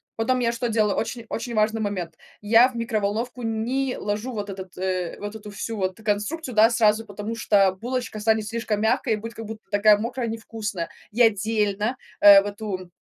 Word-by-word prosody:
Потом 250 +3 +1
я 235 -1 +1
что 235 0 -2
делала? 215 -2 +2
Очень-очень 230 0 -4
важный 215 +1 +1
момент: 180 -6 -3 0.3
я 225 +4 +6
в 250 - -14
микроволновку 230 +2 -2
не 240 +4 -1
ложу 210 +5 -3
вот 205 -2 -4
этот, 190 -1 -8
э, 185 -2 -2
вот 205 +1 -6
эту 210 -1 -9
всю 220 +2 -5
вот 185 -1 -2
конструкцию, 220 +7 -2
да, 220 +2 +7
сразу, 225 -1 +2
потому 210 +2 -6
что 200 -4 +3
булочка 235 +1 -4
станет 220 0 +1
слишком 225 -2 -2
мягкая 220 +1 +2
и - - -5
будет 230 +2 -7
как 225 -1 -8
будто 215 +1 -8
такая 205 0 +5
мокрая, 235 +2 -3
невкусная. 220 -5 -4 0.2
Я 235 +2 +5
отдельно, 215 +2 0 0.2
э, 200 -1 +10
в - - -9
эту 200 -3 -5
220 Hz, 185 wpm, -24 LUFS, 205-230 Hz, 0.3 s, э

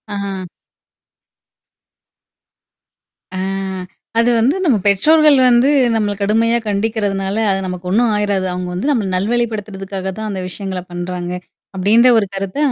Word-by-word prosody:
ஆஹ. 195 -2 -4 2.9
ஆ. - - -3 0.8
அது 230 +1 +3
வந்து 255 +8 +2
நம்ம 265 -9 +3
பெற்றோர்கள் 300 +9 +5
வந்து 245 +3 +4 0.3
நம்மள 210 -2 0
கடுமையா 225 +3 +2
கண்டிக்கிறதுனால, 200 -2 -1 0.2
அது 195 - 0
நமக்கு 180 -1 -6
ஒண்ணும் 225 +4 +2
ஆயிராது. 205 -2 0
அவுங்க 180 0 -4
வந்து 190 +11 -2
நம்மள 225 -8 0
நல்வழிப்படுத்துறதுக்காக 200 -3 -3
தான் 220 0 -4
அந்த 195 -2 -4
விஷயங்கள 190 0 -5
பண்றாங்க. 175 0 -5 0.4
அப்பிடின்ற 215 +6 +4
ஒரு 215 - +2
கருத்த, 195 +2 -4
200 Hz, 120 wpm, -17 LUFS, 190-230 Hz, 2.9 s, பெற்றோர்கள்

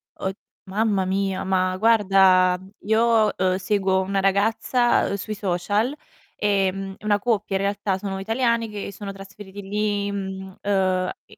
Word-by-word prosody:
Od 190 0 -4 0.3
mamma 200 -1 0
mia, 195 0 -1
ma 185 -1 +1
guarda, 190 -4 +4 0.2
io, 220 0 +3
uhm, 185 -1 +1
seguo 190 -1 +1
una 195 +1 -1
ragazza, 220 +5 +2
uhm, - - -1
sui 205 +2 -5
social, 205 +7 -1 0.4
ehm, 195 -1 0
una 210 -1 +1
coppia 210 -3 -1
in 190 - 0
realtà, 200 -1 -1
sono 195 0 -4
italiani 230 +2 0
che 205 -1 -6
sono 200 0 -7
trasferiti 195 0 -11
lì, 205 0 -1
mhmm, 190 -1 -6
uhm, 185 -2 +1
e - - -18
195 Hz, 140 wpm, -23 LUFS, 190-210 Hz, 0.4 s, guarda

